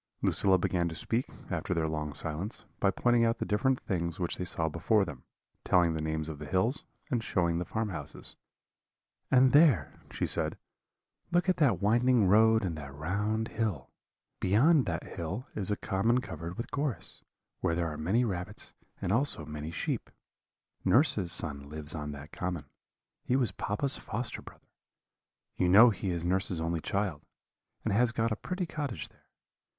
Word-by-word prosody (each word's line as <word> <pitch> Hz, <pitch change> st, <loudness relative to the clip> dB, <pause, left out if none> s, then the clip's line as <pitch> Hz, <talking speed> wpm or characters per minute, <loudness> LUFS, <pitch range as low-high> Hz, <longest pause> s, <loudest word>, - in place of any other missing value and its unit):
"Lucilla 95 Hz, -1 st, +3 dB
began 85 Hz, -1 st, 0 dB
to 80 Hz, -, -7 dB
speak, 115 Hz, +8 st, -1 dB, 0.2 s
after 90 Hz, -, -1 dB
their 80 Hz, -1 st, +1 dB
long 75 Hz, -1 st, -2 dB
silence, 90 Hz, -, -3 dB
by 100 Hz, -, +3 dB
pointing 120 Hz, +4 st, +2 dB
out 115 Hz, 0 st, +2 dB
the -, -, -3 dB
different 125 Hz, +5 st, +1 dB
things 85 Hz, -3 st, -3 dB
which 85 Hz, -1 st, -1 dB
they 90 Hz, -, -3 dB
saw 80 Hz, -2 st, 0 dB
before 95 Hz, +6 st, +2 dB
them, 85 Hz, -, -9 dB, 0.4 s
telling 85 Hz, -2 st, +3 dB
the 80 Hz, -, -3 dB
names 80 Hz, 0 st, -2 dB
of 80 Hz, -3 st, -6 dB
the 75 Hz, -, -7 dB
hills, 105 Hz, -, +1 dB, 0.3 s
and 120 Hz, -3 st, 0 dB
showing 85 Hz, -5 st, +1 dB
the 90 Hz, -, -3 dB
farm 110 Hz, +2 st, -2 dB
houses. 75 Hz, -6 st, -6 dB, 0.9 s
"'And 130 Hz, -1 st, +5 dB
there,' 140 Hz, -, +4 dB
she -, -, -2 dB
said, -, -, -1 dB, 0.7 s
'look 175 Hz, +2 st, +2 dB
at 185 Hz, -, +2 dB
that 140 Hz, -, +2 dB
winding 120 Hz, 0 st, +4 dB
road 110 Hz, +3 st, +5 dB
and 90 Hz, -4 st, -2 dB
that 70 Hz, -2 st, -8 dB
round 105 Hz, +8 st, -1 dB
hill. 105 Hz, -, -3 dB, 0.5 s
Beyond 135 Hz, -, +4 dB
that -, -, -2 dB
hill 90 Hz, +10 st, -5 dB
is 100 Hz, -2 st, -2 dB
a 105 Hz, -, +1 dB
common 110 Hz, +5 st, +1 dB
covered 85 Hz, -9 st, -7 dB
with 115 Hz, -, -5 dB
gorse, 140 Hz, -3 st, -3 dB, 0.4 s
where 85 Hz, -, 0 dB
there 85 Hz, 0 st, 0 dB
are -, -, -6 dB
many 95 Hz, +11 st, +1 dB
rabbits, 90 Hz, -5 st, -5 dB, 0.3 s
and 90 Hz, -, 0 dB
also 115 Hz, -, +2 dB
many 75 Hz, 0 st, -6 dB
sheep. 85 Hz, -, -3 dB, 0.7 s
Nurse's 100 Hz, -, +4 dB
son 70 Hz, -4 st, +4 dB
lives 75 Hz, 0 st, -5 dB
on 75 Hz, -2 st, -4 dB
that 75 Hz, +2 st, -9 dB
common: 90 Hz, -4 st, -4 dB, 0.6 s
he 125 Hz, -, +1 dB
was 125 Hz, -7 st, +2 dB
papa's 105 Hz, +9 st, -2 dB
foster 115 Hz, +3 st, -4 dB
brother. -, -, -15 dB, 0.9 s
You 90 Hz, -, +2 dB
know 110 Hz, +6 st, +8 dB
he 100 Hz, -1 st, -3 dB
is 85 Hz, -1 st, -2 dB
nurse's 95 Hz, -1 st, +1 dB
only 80 Hz, +1 st, -1 dB
child, 95 Hz, -7 st, -2 dB, 0.6 s
and -, -, +1 dB
has 120 Hz, +3 st, +3 dB
got 115 Hz, -1 st, 0 dB
a -, -, +1 dB
pretty 180 Hz, -, -3 dB
cottage 145 Hz, -, -4 dB
there. -, -, -30 dB
95 Hz, 175 wpm, -30 LUFS, 85-115 Hz, 0.9 s, know